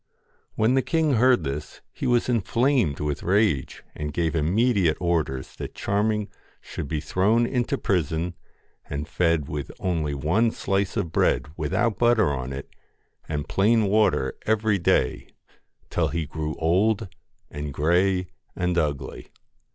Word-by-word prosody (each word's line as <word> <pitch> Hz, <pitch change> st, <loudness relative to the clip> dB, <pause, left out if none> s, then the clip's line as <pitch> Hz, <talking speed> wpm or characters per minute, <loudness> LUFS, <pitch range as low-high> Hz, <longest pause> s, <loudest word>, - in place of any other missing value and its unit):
When 110 Hz, +3 st, +3 dB
the 135 Hz, -, +3 dB
king 160 Hz, 0 st, +1 dB
heard 125 Hz, -4 st, +4 dB
this, 75 Hz, +1 st, -5 dB
he -, -, -3 dB
was 120 Hz, -1 st, +2 dB
inflamed 120 Hz, -, +1 dB
with 75 Hz, -1 st, -2 dB
rage, 95 Hz, -7 st, +1 dB
and 75 Hz, 0 st, -4 dB
gave 80 Hz, +2 st, -1 dB
immediate 95 Hz, +2 st, +2 dB
orders 80 Hz, -7 st, -1 dB
that -, -, -7 dB
Charming 105 Hz, +1 st, 0 dB, 0.3 s
should -, -, -6 dB
be 75 Hz, +2 st, -2 dB
thrown 100 Hz, +10 st, +2 dB
into 120 Hz, 0 st, -1 dB
prison 85 Hz, -2 st, -1 dB, 0.6 s
and 70 Hz, +1 st, -4 dB
fed 85 Hz, -4 st, +1 dB
with 75 Hz, -1 st, -4 dB
only 80 Hz, -6 st, -1 dB
one 85 Hz, +12 st, +2 dB
slice 100 Hz, -2 st, -1 dB
of 85 Hz, -, -1 dB
bread 75 Hz, -, +1 dB
without 105 Hz, +9 st, 0 dB
butter 120 Hz, -7 st, +4 dB
on 65 Hz, -1 st, -4 dB
it, 70 Hz, +1 st, -6 dB, 0.6 s
and 75 Hz, -1 st, -3 dB
plain 110 Hz, +3 st, +3 dB
water 100 Hz, -10 st, +2 dB
every 110 Hz, -2 st, +2 dB
day, 65 Hz, -7 st, +1 dB, 0.6 s
till -, -, +1 dB
he 85 Hz, -2 st, -2 dB
grew 75 Hz, +1 st, -4 dB
old 95 Hz, +6 st, +1 dB, 0.4 s
and 75 Hz, 0 st, -5 dB
grey 90 Hz, +6 st, +2 dB, 0.3 s
and 90 Hz, -1 st, 0 dB
ugly. 70 Hz, -4 st, -3 dB
90 Hz, 140 wpm, -25 LUFS, 75-110 Hz, 0.6 s, heard